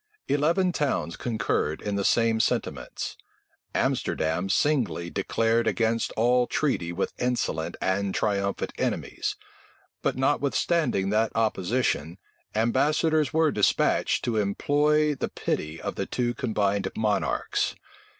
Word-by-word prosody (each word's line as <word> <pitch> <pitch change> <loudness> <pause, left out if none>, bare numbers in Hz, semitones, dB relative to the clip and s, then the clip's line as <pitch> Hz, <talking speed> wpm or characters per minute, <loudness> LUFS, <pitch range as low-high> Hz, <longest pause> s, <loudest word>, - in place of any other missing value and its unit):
Eleven 165 +6 +2
towns 130 - -1
concurred 100 -9 -1
in 105 -1 -3
the 100 - 0
same 115 +1 +3
sentiments. - - -2 0.6
Amsterdam 80 +4 0
singly 120 - +1
declared 115 +4 +1
against 115 0 +1
all 120 +2 +3
treaty 110 - 0
with 90 +3 -2
insolent 85 -10 -1
and 95 +1 0
triumphant 100 -1 -1
enemies: - - -2 0.7
but - - 0
notwithstanding 135 - +1
that 110 +1 +2
opposition, 100 -6 0 0.4
ambassadors 145 +6 +2
were 160 -1 +3
despatched 105 -5 +2
to 115 -2 0
implore 150 +9 +2
the 135 - -3
pity 75 +2 -3
of - - -4
the - - -3
two 120 -1 -1
combined 105 -6 0
monarchs. 105 -1 0
115 Hz, 110 wpm, -26 LUFS, 100-140 Hz, 0.7 s, same